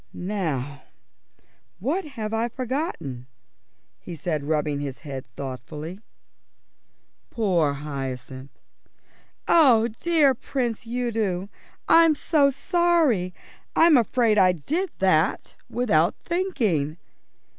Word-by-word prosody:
"Now, 150 -8 -3 1.0
what 295 - -2
have 215 0 -3
I 225 +1 +1
forgotten?" 245 - -4 0.7
he 175 - -8
said, 155 -2 -3
rubbing 150 -1 0
his 140 -2 -6
head 135 -3 -6
thoughtfully. 145 +7 -7 1.3
Poor 175 -10 +1
Hyacinth! 135 -2 -6 1.0
"Oh, 245 -9 +5
dear 295 +3 +2
Prince 240 -3 -3
Udo, 225 -6 -2 0.4
I'm 330 -1 +6
so 290 -1 +3
sorry. 315 - +1 0.4
I'm 330 -1 +6
afraid 230 -2 +3
I 185 -1 +5
did 320 - -2
that 180 -3 +1 0.2
without 190 -10 +2
thinking." 215 - -1
205 Hz, 90 wpm, -24 LUFS, -, 1.3 s, I'm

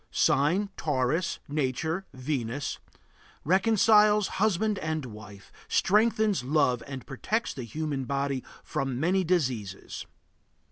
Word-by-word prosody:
Sign: 180 +9 +2
Taurus. 150 +3 0
Nature: 155 +6 -2
Venus. 130 0 -3 0.6
Reconciles 210 +2 +4
husband 215 0 +2
and 155 -2 -2
wife, 105 -3 -11 0.2
strengthens 215 - +2
love, 130 -3 +2
and 135 -2 -7
protects 215 - -2
the 135 - -6
human 145 +1 -3
body 140 -1 -1 0.2
from 135 -4 -2
many 185 +5 +2
diseases. 125 - -2
150 Hz, 100 wpm, -28 LUFS, 130-190 Hz, 0.6 s, Reconciles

